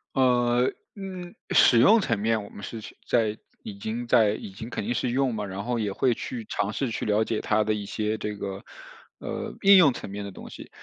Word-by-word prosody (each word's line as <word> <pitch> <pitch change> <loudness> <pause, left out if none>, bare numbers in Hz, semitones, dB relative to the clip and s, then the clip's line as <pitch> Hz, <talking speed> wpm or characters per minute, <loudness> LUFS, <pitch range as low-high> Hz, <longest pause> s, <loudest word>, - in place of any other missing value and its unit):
呃， 125 -1 +3 0.3
嗯， 185 -3 -7 0.2
使 120 - +6
用 210 - +6
层 115 - -1
面 110 0 0
我 - - -11
们 100 - -11
是 115 +1 -6 0.3
在 110 -3 +1 0.3
已 100 - -8
经 115 +4 -4
在 115 -4 +4
已 105 - -6
经 110 +4 -8
肯 120 - -4
定 120 +4 -1
是 125 - -1
用 130 -1 +1
嘛， 105 -1 -3
然 100 0 -5
后 120 +1 -1
也 105 -3 -2
会 125 +3 +2
去 115 0 -6
尝 105 +1 -1
试 135 -4 -2
去 - - -3
了 105 +1 +2
解 110 -1 -2
它 110 0 +1
的 110 0 0
一 105 -1 -4
些 110 +1 -2
这 105 0 -4
个， 100 -1 -6 0.5
呃， - - -5
应 200 0 +8
用 150 -8 +6
层 - - -8
面 100 +1 -6
的 100 - -7
东 - - -11
西， - - -11
110 Hz, 245 characters per minute, -26 LUFS, 105-125 Hz, 0.5 s, 应